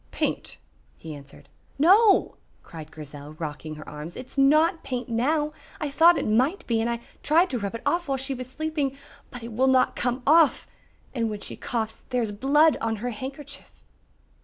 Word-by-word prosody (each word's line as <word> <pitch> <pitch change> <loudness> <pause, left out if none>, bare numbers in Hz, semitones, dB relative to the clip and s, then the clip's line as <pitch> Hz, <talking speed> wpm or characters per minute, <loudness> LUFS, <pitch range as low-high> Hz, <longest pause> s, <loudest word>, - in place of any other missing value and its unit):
"Paint," - - -3 0.4
he 160 -1 -8
answered. 140 -1 -13 0.3
"No," 390 +8 +5 0.3
cried 155 -2 -10
Grizel, 145 -1 -10
rocking 155 -1 -6
her 150 - -11
arms, 150 +3 -8
"it 255 - -7
is - - -9
not 310 +5 +4
paint 250 -1 -4
now. 295 +6 0 0.3
I 300 -3 -3
thought 335 +4 +6
it - - -2
might 255 - +1
be 230 -2 +1
and 230 - 0
I 235 0 -3 0.2
tried 335 +5 +3
to 250 - -1
rub 200 +1 -4
it 230 - -7
off 345 -1 0
while 270 -1 0
she 270 +1 -4
was 255 -1 -7
sleeping, 295 -1 -2 0.3
but 245 -2 -8
it 230 -1 -7
will 260 +4 +2
not 260 -1 +3
come 245 +1 -1
off. 315 +1 +4 0.5
And 230 -3 -1
when 210 -1 -6
she - - -6
coughs 225 -2 -4
there 250 -2 0
is 215 - -3
blood 285 +8 +3
on 225 0 0
her 245 +4 -4
handkerchief." 270 +6 -8
255 Hz, 190 wpm, -25 LUFS, 215-295 Hz, 0.5 s, thought